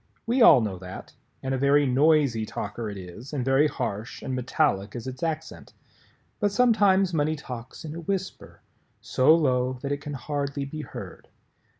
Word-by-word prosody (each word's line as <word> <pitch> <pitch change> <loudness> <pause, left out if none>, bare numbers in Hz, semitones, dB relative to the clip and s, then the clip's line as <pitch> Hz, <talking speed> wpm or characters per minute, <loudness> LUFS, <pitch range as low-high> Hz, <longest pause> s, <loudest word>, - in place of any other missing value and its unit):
We 245 +3 +1
all 180 - +8
know 100 -5 -3
that, 90 0 -9 0.3
and 135 0 -1
a 130 - -1
very 140 +2 +4
noisy 140 -3 +3
talker 110 +1 -5
it 100 - -7
is 95 - -10
and 130 -4 -2
very 135 +3 +4
harsh 120 -5 -5
and 130 - -3
metallic 125 -5 0
is 120 - -6
its 130 +4 -7
accent. 160 -1 -4 0.7
But 205 -2 +1
sometimes 200 -5 +3
money 155 0 +1
talks 125 0 -8
in 155 - -6
a 170 - -6
whisper, 190 +3 -5 0.4
so 130 +5 +4
low 130 -5 +1
that 140 - -2
it 145 0 -2
can 145 0 -6
hardly 140 +1 -3
be 155 +3 -6
heard. - - -9
140 Hz, 175 wpm, -26 LUFS, 125-155 Hz, 0.7 s, all